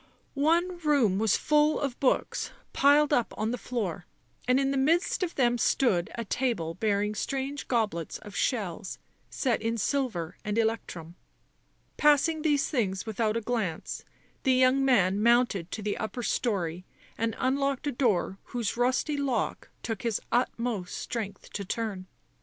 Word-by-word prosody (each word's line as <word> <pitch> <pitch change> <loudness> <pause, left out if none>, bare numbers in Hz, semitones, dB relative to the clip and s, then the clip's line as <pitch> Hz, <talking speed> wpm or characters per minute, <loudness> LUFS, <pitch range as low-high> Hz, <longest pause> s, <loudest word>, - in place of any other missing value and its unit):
One 340 +5 +1
room 280 - +2
was 220 -2 +3
full 300 0 +3
of 275 -4 -3
books, 265 - +1 0.2
piled 290 +1 +5
up 245 -5 +1
on 220 +1 -1
the - - 0
floor, 200 -9 -3 0.4
and 255 +1 +4
in 275 0 +1
the - - 0
midst 320 +10 +2
of 355 -2 -2
them 240 -2 +2
stood 205 -9 +2
a 230 -1 -4
table 205 -9 -1
bearing 205 +2 0
strange 270 +6 -3
goblets 210 - -1
of 205 - -12
shells 200 -6 -2 0.3
set 245 -6 0
in 225 +1 -1
silver 220 - -1
and 210 +1 -2
electrum. 185 -7 -2 0.8
Passing 300 +2 +4
these 295 -3 +2
things 195 -8 -1
without 220 0 0
a - - -2
glance 215 -8 -3 0.4
the 265 - +3
young 255 +1 +4
man 205 -7 +3
mounted 235 -6 +3
to 215 - -5
the 205 0 -1
upper 235 +3 -4
storey 180 -8 -1 0.3
and 225 0 -1
unlocked 275 +1 0
a 290 - 0
door 210 -7 0
whose 235 -4 -2
rusty 255 +4 +1
lock 270 -5 -1
took 225 -3 -3
his 230 -3 0
utmost 235 -6 -1
strength 215 -4 -5
to 200 - -4
turn. 200 -2 -4
235 Hz, 155 wpm, -28 LUFS, 205-275 Hz, 0.8 s, piled